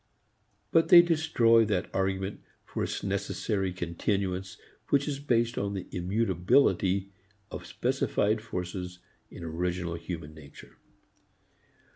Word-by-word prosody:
But 165 Hz, 0 st, +4 dB
they 170 Hz, -1 st, +10 dB
destroy 155 Hz, -9 st, +4 dB
that 100 Hz, -3 st, -1 dB
argument 95 Hz, +1 st, -1 dB, 0.2 s
for -, -, -3 dB
its -, -, -3 dB
necessary 100 Hz, 0 st, -1 dB
continuance 90 Hz, +2 st, -2 dB, 0.3 s
which 140 Hz, 0 st, +2 dB
is 140 Hz, -2 st, -2 dB
based 120 Hz, -4 st, +1 dB
on 100 Hz, 0 st, -2 dB
the 95 Hz, -, -4 dB
immutability 95 Hz, +1 st, +1 dB, 0.4 s
of -, -, -7 dB
specified 105 Hz, +2 st, 0 dB
forces 90 Hz, -4 st, -5 dB, 0.3 s
in 85 Hz, -, -10 dB
original 85 Hz, +1 st, -2 dB
human 80 Hz, -2 st, -6 dB
nature. 75 Hz, -2 st, -14 dB
95 Hz, 110 wpm, -29 LUFS, 90-115 Hz, 0.4 s, they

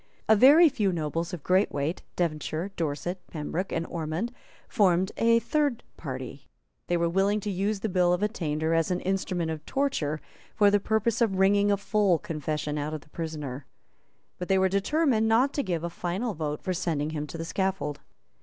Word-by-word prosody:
A 220 Hz, -, +6 dB
very 290 Hz, +10 st, +8 dB
few 210 Hz, -9 st, +1 dB
nobles 165 Hz, +1 st, -2 dB
of 175 Hz, -6 st, -6 dB
great 185 Hz, +2 st, +3 dB
weight, 145 Hz, +5 st, -2 dB
Devonshire, 165 Hz, +2 st, -2 dB
Dorset, 165 Hz, +3 st, -3 dB
Pembroke 165 Hz, +4 st, -4 dB
and 165 Hz, 0 st, -1 dB
Ormond, 165 Hz, +8 st, -3 dB, 0.4 s
formed 190 Hz, -4 st, +2 dB
a 230 Hz, 0 st, +4 dB
third 285 Hz, 0 st, 0 dB
party. 130 Hz, -2 st, -7 dB, 0.4 s
They 175 Hz, -, +1 dB
were 170 Hz, 0 st, +1 dB
willing 195 Hz, +4 st, +2 dB
to 205 Hz, -, -3 dB
use 200 Hz, +2 st, -1 dB
the 220 Hz, -, 0 dB
Bill 180 Hz, -3 st, +2 dB
of 180 Hz, +3 st, +1 dB
Attainder 160 Hz, -7 st, -1 dB
as 165 Hz, -1 st, +2 dB
an 180 Hz, -1 st, 0 dB
instrument 185 Hz, -3 st, -1 dB
of 155 Hz, -1 st, -5 dB
torture 160 Hz, -, -1 dB, 0.4 s
for 205 Hz, -1 st, +5 dB
the 205 Hz, -, +4 dB
purpose 220 Hz, +3 st, 0 dB
of 220 Hz, -5 st, +2 dB
wringing 200 Hz, +1 st, +4 dB
a 200 Hz, -, +3 dB
full 200 Hz, -3 st, +2 dB
confession 150 Hz, -1 st, -3 dB
out 150 Hz, +2 st, -3 dB
of 155 Hz, -, -6 dB
the -, -, -21 dB
prisoner. 150 Hz, -5 st, -5 dB, 0.7 s
But 180 Hz, -, -4 dB
they 195 Hz, -, +3 dB
were 190 Hz, 0 st, +3 dB
determined 220 Hz, -, +2 dB
not 245 Hz, +5 st, +3 dB
to 285 Hz, -, 0 dB
give 175 Hz, -, -2 dB
a -, -, -1 dB
final 190 Hz, +8 st, -2 dB
vote 150 Hz, -3 st, -4 dB
for 185 Hz, -, -1 dB
sending 160 Hz, -4 st, -1 dB
him 150 Hz, -1 st, -4 dB
to 155 Hz, -, -7 dB
the 165 Hz, -, -4 dB
scaffold. 190 Hz, -6 st, -2 dB
180 Hz, 190 wpm, -27 LUFS, 155-205 Hz, 0.7 s, very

